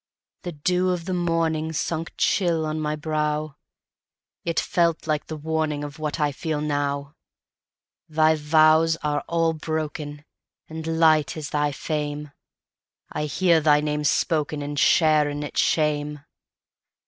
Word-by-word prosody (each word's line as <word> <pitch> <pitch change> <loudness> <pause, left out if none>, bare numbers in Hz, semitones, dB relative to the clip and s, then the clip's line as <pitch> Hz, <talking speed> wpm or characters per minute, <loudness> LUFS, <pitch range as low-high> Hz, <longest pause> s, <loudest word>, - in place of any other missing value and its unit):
The 175 -2 -6
dew 180 +5 +1
of 175 -2 -2
the 185 - -2
morningSunk 165 -2 -1
chill 170 -4 +1
on 155 0 -2
my 150 0 -1
brow; 150 -1 -2 0.9
It 170 -1 0
felt 170 -2 +1
like 155 -2 -1
the 155 - -5
warningOf 150 -2 -2
what 155 +1 -3
I 150 -1 +2
feel 155 +2 -3
now. 145 -1 -2 1.0
Thy 155 0 +4
vows 155 +1 +4
are 150 -1 0
all 165 -1 +1
broken, 150 -2 -4 0.4
And 160 0 -7
light 155 -2 +4
is 150 -2 -6
thy 150 0 +1
fame:I 150 0 -7
hear 170 +2 +3
thy 150 -1 +5
name 150 0 -1
spokenAnd 145 -1 0
share 155 -2 +4
in 145 0 -4
its 145 - 0
shame. 150 -1 0
155 Hz, 125 wpm, -24 LUFS, 150-160 Hz, 1.0 s, thy